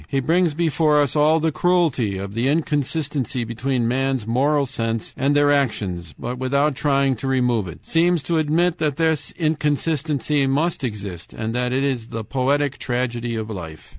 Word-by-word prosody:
He 135 - 0
brings 165 +3 +2
before 155 -2 +2
us 145 -2 +1
all 155 +2 +4
the 160 0 +1
cruelty 155 - +1
of 100 +1 -6
the 115 +4 0
inconsistency 145 -4 -1
between 120 +1 -1
men's 130 -1 0
moral 140 +5 +2
sense 115 -4 -3
and 140 +2 +1
their 145 0 +4
actions, 95 - -1
but 125 +1 -5
without 140 +3 +1
trying 140 -1 +2
to 135 - -4
remove 125 -6 +1
it; 85 - -11
seems 170 -1 +2
to 160 +4 0
admit 165 +3 +1
that 150 -3 0
this 160 -3 +1
inconsistency 150 -2 0
must 145 +3 0
exist 100 -7 -5
and 110 0 -4
that 125 0 -1
it 130 +2 +1
is 130 -5 -1
the 115 -1 -5
poetic 140 +3 0
tragedy 120 -1 -2
of 110 -1 -3
life. 80 -6 -8
135 Hz, 170 wpm, -22 LUFS, 120-150 Hz, -, all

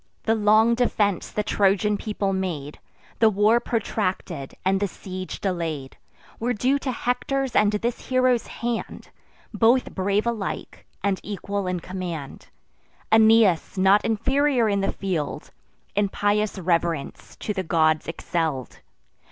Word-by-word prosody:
The 225 - +2
long 220 +1 +4
defence 210 -6 0
the 210 - -1
Trojan 205 +1 +2
people 205 -2 -2
made, 165 -7 -4 0.4
The 225 - +6
war 215 +3 +3
protracted, 190 - -3
and 190 0 +2
the 205 - 0
siege 185 0 -7
delay'd, 165 -8 -3 0.4
Were 245 +2 0
due 255 +6 +1
to 270 - -2
Hector's 255 +2 -1
and 210 -1 +4
this 230 +3 -3
hero's 255 -2 +2
hand: 235 -1 -5 0.4
Both 240 +3 +3
brave 200 +3 0
alike, 230 -4 -4 0.2
and 200 -2 +1
equal 200 -1 -4
in 180 -1 -2
command; 175 -6 -6 0.6
Aeneas, 220 -6 +4
not 195 +2 +5
inferior 265 +2 +2
in 200 -1 +1
the 195 - 0
field, 175 -7 -3 0.4
In 205 0 +1
pious 205 +1 0
reverence 170 -5 -2
to 210 - -4
the 190 - -2
gods 160 -3 +2
excell'd. 160 -6 -3
205 Hz, 130 wpm, -24 LUFS, 185-225 Hz, 0.6 s, The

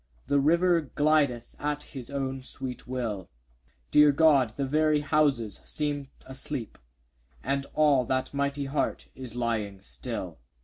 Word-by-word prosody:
The 140 +2 +2
river 170 +4 +3
glideth 145 -4 +1
at 150 0 -2
his 130 -4 -8
own 135 -1 -3
sweet 130 0 -1
will: 115 -8 -3 0.6
Dear 150 0 +7
God! 140 -4 +4
the 140 - 0
very 150 +2 +2
houses 145 -8 +1
seem 145 -2 -2 0.2
asleep; 130 -2 -6 0.6
And 140 0 -1
all 145 -4 +4
that 130 +3 -1
mighty 140 0 -1
heart 140 +2 -2
is 125 -3 -9
lying 110 -5 -2
still! 95 - -6
140 Hz, 130 wpm, -28 LUFS, 125-150 Hz, 0.6 s, Dear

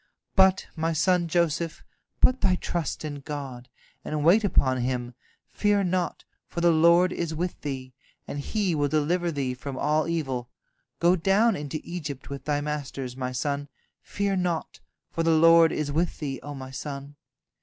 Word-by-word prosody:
But, 190 -1 +5
my 165 0 0
son 175 +2 +2
Joseph, 170 -1 0 0.4
put 255 +1 +4
thy 185 -2 +4
trust 170 -3 -3
in 145 -2 -5
God, 135 -4 -7 0.3
and 150 -1 -2
wait 190 +8 +5
upon 130 -10 +2
Him. 125 0 -2 0.3
Fear 205 -1 +1
not, 180 -2 -1 0.2
for - - -5
the 170 0 +5
Lord 170 +3 +5
is 165 -2 -3
with 175 +3 -3
thee, 130 -3 -5 0.3
and 145 - -4
He 195 +4 -1
will 145 -2 +1
deliver 170 +4 +1
thee 135 -4 -2
from 130 +1 -6
all 155 +3 +1
evil. 135 -7 -2 0.5
Go 175 +2 +4
down 195 +5 +3
into 150 0 -4
Egypt 150 -6 -6
with 140 - -6
thy 145 -1 0
masters, 140 -4 -4
my 130 -1 -3
son; 140 +3 -2 0.3
fear 200 -1 -1
naught, 175 -3 -2 0.3
for 165 - -2
the 165 -1 +3
Lord 165 0 +7
is 150 -1 -2
with 165 +4 0
thee, 135 -4 -4
O 145 0 -7
my 130 -1 -8
son." 140 +1 -6
155 Hz, 165 wpm, -26 LUFS, 140-175 Hz, 0.5 s, Lord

